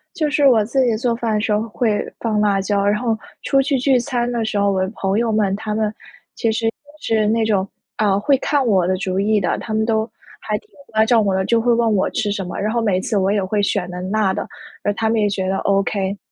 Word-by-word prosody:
就 305 -3 0
是 290 -1 +3
我 230 -5 +5
自 260 +3 +1
己 230 -3 +2
做 235 0 0
饭 230 -2 -2
的 210 - 0
时 215 - -1
候 210 +1 +2
会 215 -2 0
放 215 -2 0
辣 200 -2 +2
椒， 200 0 0
然 205 +2 +2
后 230 -3 0 0.3
出 275 0 +3
去 275 0 0
聚 255 0 +3
餐 245 -1 -1
的 235 -2 -1
时 215 - -2
候， 200 0 +2
我 190 -1 0
的 190 - -1
朋 195 +1 -1
友 230 -1 0
们 205 -3 +1
他 210 0 -4
们 215 -1 0 0.4
其 230 -2 0
实 225 +1 -2
也 225 - +2 0.3
是 220 -2 +1
那 225 0 +2
种， 200 -3 +1 0.3
啊， 200 -2 +2
会 270 +6 +3
看 280 -1 0
我 190 -5 +2
的 185 - +1
主 190 -1 -2
意 210 +1 +2
的， 180 - 0
他 220 - -5
们 220 0 +1
都 220 0 0 0.3
还 - - -2
挺 430 - -29 0.2
关 220 0 +4
照 230 -1 +4
我 200 -2 +1
的， 190 0 0
就 230 -1 +2
会 240 +1 +2
问 230 -2 +2
我 190 - +1
吃 210 -2 -1
什 200 -1 -2
么， 180 - -6
然 210 +2 -1
后 235 - +1
每 195 -4 +1
次 205 +2 -1
我 195 +1 +2
也 205 -2 +1
会 205 +2 0
选 195 -3 -1
的 180 0 -6
辣 195 0 +1
的， - - -4 0.4
而 205 - +1
他 220 +1 -1
们 225 - +1
也 205 - +2
觉 190 -2 -2
得 190 +1 0
OK。 195 0 0
215 Hz, 290 characters per minute, -20 LUFS, 200-230 Hz, 0.4 s, 我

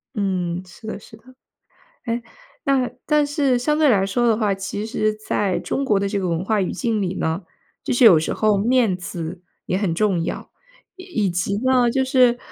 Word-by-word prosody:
嗯， 185 -4 -1
是 185 +5 -15
的 - - -5
是 220 - -15
的。 220 - -26 0.8
诶， 235 0 -2 0.4
那 265 -3 +1 0.2
但 300 -1 +3
是 285 -3 +1
相 300 +5 0
对 310 -2 +4
来 195 -5 +3
说 240 +5 +1
的 225 -2 +3
话， 210 -3 +1
其 195 +2 -4
实 215 -1 0
在 210 -3 -1
中 275 - -2
国 210 -7 +2
的 200 - 0
这 200 0 -1
个 185 - -2
文 165 +1 -1
化 215 0 +1
语 185 - -1
境 225 -4 -1
里 185 -1 -2
呢， 165 +3 -2 0.4
就 - - -1
是 245 0 +5
有 180 -8 +8
时 160 - -2
候 215 -2 +2
面 230 -1 +2
子 175 -1 -6 0.2
也 185 - -1
很 195 -4 0
重 190 -3 +1
要。 175 - -5 0.5
以 355 - -2
及 180 +3 -1
呢， 255 -2 +4
就 265 +3 +1
是 250 -2 +4
215 Hz, 215 characters per minute, -21 LUFS, 190-245 Hz, 0.8 s, 有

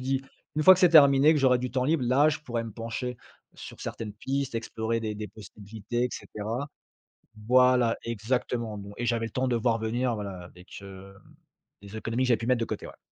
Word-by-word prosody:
dit: 135 +1 -1 0.3
«Une 155 - +2
fois 185 - +10
que 185 - +2
c'est 180 - +7
terminé 145 -1 +6
que 150 - +1
j'aurai 125 -2 +4
du 125 0 -4
temps 130 0 0
libre, 150 -3 +1
là 140 +5 +4
je 150 - -3
pourrais 120 -5 -4
me 115 - -7
pencher, 115 +3 -5 0.4
sur - - -11
certaines 105 -2 -6
pistes 135 +2 -3
explorer 115 0 -2
des 110 -1 -3
des 105 0 -6
possibilités» 110 +3 -5
et - - 0
cetera. 115 +7 -5 0.8
Voilà, 125 -2 +4
exactement. 115 -1 -2
Bon 100 0 -9
et 120 - -3
j'avais 115 -1 0
le - - -13
temps 130 0 -1
de 125 - +1
voir 115 0 +1
venir 120 +2 -1
voilà, 100 -3 -6
avec, 90 +2 -13
heu, 95 0 -11 0.7
les 100 +2 -11
économies 115 +3 -2
que - - 0
j'avais 120 - +4
pu 115 - -5
mettre 125 -1 +2
de 115 - -1
côté, - - -6
ouais. - - -13
120 Hz, 215 wpm, -27 LUFS, 110-130 Hz, 0.8 s, fois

